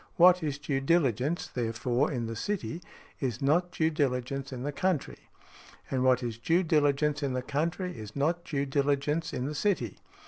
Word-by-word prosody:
What 180 +1 +7
is 145 -3 -2
due 140 -2 -2
diligence, 140 0 +1
therefore, 120 +2 -1
in 120 -4 -2
the 115 0 -4
city, 180 - -3 0.4
is 125 -4 -2
not 170 +6 +2
due 160 -1 +1
diligence 135 -1 -1
in 125 -1 -5
the 145 - -1
country; 145 - -2 0.6
and 130 -1 +1
what 130 -1 +4
is 115 -1 -4
due 165 +10 +2
diligence 150 -2 +2
in 140 -3 -1
the 125 0 -2
country 170 +7 -2
is 110 -2 -9
not 165 +5 0
due 140 -4 -1
diligence 145 +3 0
in 125 - -3
the 150 - -3
city. 150 - -1
140 Hz, 175 wpm, -29 LUFS, 125-160 Hz, 0.6 s, What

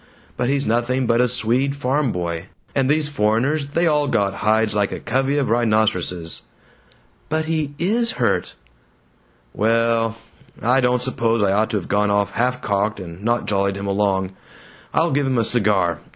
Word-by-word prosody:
but 125 - -1
he's 140 0 0
nothing 120 +3 0
but 115 +1 +3
a 125 - +3
Swede 125 +3 0
farm 140 -1 0
boy, 85 0 -4 0.3
and 135 -1 +1
these 150 0 +2
foreigners, 140 +3 0
they 170 +4 +1
all 150 -3 +2
got 100 -6 +1
hides 110 +2 +1
like 105 -1 0
a - - -4
covey 135 +4 0
of 140 - +1
rhinoceroses 110 -7 0 0.4
." - - -34
"But 155 +1 0
he 155 -3 -2
IS 225 +8 0
hurt!" 120 -3 -1 1.0
"Well 115 +1 +1 0.4
I 125 +3 +2
don't 125 0 +1
suppose 115 -3 0
I 100 - +2
ought 110 +2 +1
to 105 - -1
have 95 - -5
gone 105 +1 +1
off 100 0 +1
half 125 +1 -1
cocked, 100 +1 0
and 90 0 -9
not 120 +1 0
jollied 100 -1 0
him 100 - -5
along. 100 -1 0 0.6
I'll 165 0 +1
give 140 0 +1
him 130 -2 0
a 115 - +3
cigar. 100 -8 +1
115 Hz, 175 wpm, -21 LUFS, 105-135 Hz, 1.0 s, but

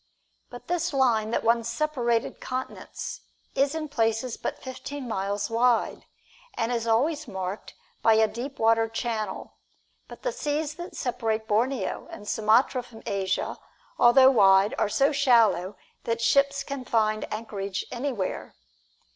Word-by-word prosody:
But 245 - -11
this 350 -3 -1
line 235 -5 +2
that 235 - -1
once 230 0 +2
separated 240 -3 -1
continents 480 - -6 0.3
is 275 +2 +1
in 315 -1 -3
places 225 -3 0
but - - -4
fifteen 260 +1 -7
miles 200 -1 -2
wide, 235 0 +1 0.5
and 230 0 -1
is 230 -1 -1
always 290 +7 +1
marked 190 +1 -5 0.3
by 225 -1 +5
a 220 0 +4
deep 240 +6 -6
water 225 0 +3
channel, 225 -3 -4 0.5
but - - -12
the - - 0
seas 300 -9 -2
that 345 +3 -9
separate 225 -3 -2
Borneo 230 +1 -1
and 210 - -10
Sumatra 225 +5 +3
from 240 -2 -14
Asia, 195 -1 -2 0.4
although 260 +2 +7
wide, 195 -3 +5
are 215 - +1
so 275 +6 +3
shallow 230 - +3 0.3
that 230 0 -1
ships 275 +4 +2
can 275 -2 -5
find 215 -3 0
anchorage 200 -3 -4
anywhere. 245 -6 -3
235 Hz, 140 wpm, -26 LUFS, 215-270 Hz, 0.5 s, although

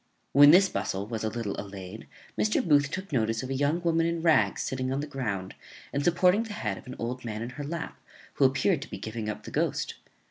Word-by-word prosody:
When 145 +1 +9
this 185 +5 +7
bustle 95 - -3
was 110 0 -4
a 110 - 0
little 110 -3 -3
allayed, 100 +1 -9 0.3
Mr. 210 -3 +1
Booth 145 -2 +4
took 190 +3 -5
notice 115 -2 0
of 130 - -5
a - - +1
young 145 +5 +1
woman 165 -1 +2
in 170 -1 -2
rags 160 -2 +3
sitting 130 -1 -2
on 135 - -1
the 145 - -2
ground, 105 -10 -4 0.4
and 140 - 0
supporting 180 +5 +4
the 225 -2 -5
head 105 - -3
of - - -16
an 130 - -7
old 125 +2 -4
man 110 -1 -4
in 120 - -6
her 145 +3 -6
lap, 165 +3 -5 0.3
who 140 - +3
appeared 135 +5 +2
to 145 - -8
be - - -6
giving 110 -1 -5
up 105 - -5
the - - -9
ghost. - - -1
135 Hz, 235 wpm, -28 LUFS, 110-165 Hz, 0.4 s, When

